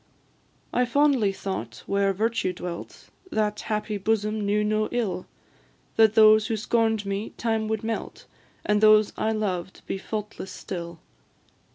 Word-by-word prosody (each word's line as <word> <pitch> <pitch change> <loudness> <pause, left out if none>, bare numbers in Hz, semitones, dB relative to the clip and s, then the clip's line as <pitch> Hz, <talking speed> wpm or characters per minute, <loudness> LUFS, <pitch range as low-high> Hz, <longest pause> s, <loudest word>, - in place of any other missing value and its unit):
I 250 - +3
fondly 260 -4 +3
thought 195 0 -5
where 200 0 +1
Virtue 220 -1 0
dwelt, 175 -1 -8 0.2
That 210 -1 0
happy 210 -1 -2
bosom 215 +1 0
knew 205 +1 +1
no 215 0 +1
ill 220 -7 -2 0.7
That 220 -1 +5
those 215 0 +7
who 225 -2 -1
scorn'd 220 -1 +1
me, 200 +2 -3
time 225 -2 0
would 220 0 -2
melt, 225 0 -4 0.4
And 210 0 +2
those 215 -1 +6
I 220 - 0
loved 190 -4 -3
be 195 - -3
faultless 210 -2 -5
still. 170 -3 -6
215 Hz, 140 wpm, -25 LUFS, 200-220 Hz, 0.7 s, those